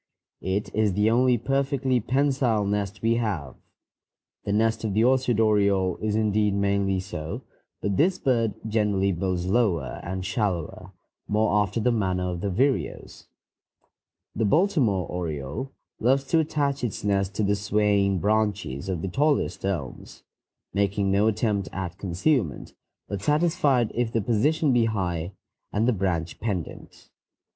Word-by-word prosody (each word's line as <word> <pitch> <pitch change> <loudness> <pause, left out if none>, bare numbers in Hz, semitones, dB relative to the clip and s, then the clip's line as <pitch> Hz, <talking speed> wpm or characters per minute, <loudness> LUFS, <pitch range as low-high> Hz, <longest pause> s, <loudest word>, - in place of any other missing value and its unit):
It 95 +2 -2
is 105 -2 +2
the 105 +3 +2
only 125 +1 +4
perfectly 135 +1 0
pensile 130 -3 +1
nest 100 +1 -2
we 115 +1 +3
have. 95 - -2 0.9
The 100 - -1
nest 110 +2 +1
of 105 -3 -2
the 110 - +4
orchard 125 -2 +2
oriole 100 -4 +2
is 105 -1 -2
indeed 105 -1 +1
mainly 100 -1 +1
so, 80 -4 -6 0.4
but 100 -2 0
this 180 +4 +3
bird 115 - +1
generally 105 -3 +1
builds 90 0 -2
lower 95 - 0
and 95 +1 -5
shallower, 95 -4 -2 0.4
more 105 +1 +1
after 105 +3 -1
the 125 +3 +2
manner 95 -5 0
of 85 -1 -5
the 100 - -1
vireos. 130 +8 -1 1.1
The 110 - 0
Baltimore 125 - +2
oriole 80 - -4 0.3
loves 135 +4 +2
to 165 - +4
attach 145 -4 -1
its 120 - -3
nest 100 -1 0
to 105 - 0
the 100 +1 +2
swaying 100 -1 +1
branches 105 -7 0
of 90 -4 -2
the - - -1
tallest 145 - 0
elms, 90 -9 -5 0.5
making 100 0 +1
no 100 +2 +3
attempt 105 -3 0
at 95 0 -5
concealment, 95 - -1 0.3
but 100 -2 -4
satisfied 150 - +2
if 120 -1 -1
the 115 - 0
position 130 +7 +2
be 120 -2 +3
high 90 -5 -2 0.4
and 110 +3 +1
the 125 - +3
branch 90 -4 -2
pendent. 95 -7 -5
105 Hz, 145 wpm, -25 LUFS, 95-120 Hz, 1.1 s, only